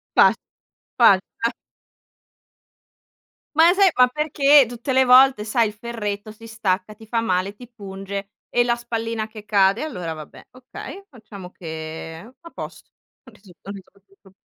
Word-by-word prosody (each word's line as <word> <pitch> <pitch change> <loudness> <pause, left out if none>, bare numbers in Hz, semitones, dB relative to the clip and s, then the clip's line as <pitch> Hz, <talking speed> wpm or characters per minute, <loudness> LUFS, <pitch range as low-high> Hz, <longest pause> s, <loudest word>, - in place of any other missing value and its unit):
Fat - - +6 0.6
fatta. 230 +1 +3 2.0
Ma 325 +2 +6
e - - +2
sai 390 -1 +5
ma 250 - +7
perché 290 0 +4
tutte 240 +3 -4
le 260 0 +4
volte 255 -3 +6
sai 225 +1 +1
il 210 - -7
ferretto 215 -2 -5
si 225 +1 -14
stacca, 205 -2 -2
ti 220 +1 -16
fa 230 +1 0
male, 190 -1 -1
ti 245 +3 -13
punge 200 -3 -7 0.2
e 240 - +2
la 240 0 +1
spallina 230 -2 -4
che 215 -1 -12
cade. 200 0 +3
Allora 180 - -5
vabbè, 155 -1 -12
okay, 255 +9 -10
facciamo 215 -7 -12
che 160 +4 -8
a 335 - -13
posto, - - -10 0.3
ho 255 - -16
risol 205 -4 -19
ho - - -10
risolto 200 0 -14
il 195 - -25
pro 195 - -20
220 Hz, 160 wpm, -22 LUFS, 195-245 Hz, 2.0 s, ma